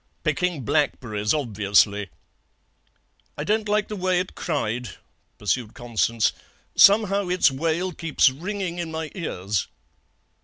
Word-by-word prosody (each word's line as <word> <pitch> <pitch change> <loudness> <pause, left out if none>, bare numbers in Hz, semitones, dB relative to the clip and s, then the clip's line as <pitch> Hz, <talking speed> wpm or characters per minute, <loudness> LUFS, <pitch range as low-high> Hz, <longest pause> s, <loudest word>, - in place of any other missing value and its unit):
"'Picking 180 -5 0
blackberries. 110 -7 0
Obviously.' 105 -6 +2 1.3
"'I 150 - -3
don't 210 +4 0
like 210 0 +1
the 210 - -5
way 185 -2 +1
it 185 - -4
cried,' 125 - -3 0.4
pursued 110 +2 -2
Constance; 115 -1 0 0.4
'somehow 200 -1 +5
its 180 -5 +4
wail 165 +6 -1
keeps 165 -2 +2
ringing 180 +4 -4
in 170 -1 -3
my 160 -1 -5
ears.' 100 - -2
155 Hz, 115 wpm, -24 LUFS, 115-185 Hz, 1.3 s, somehow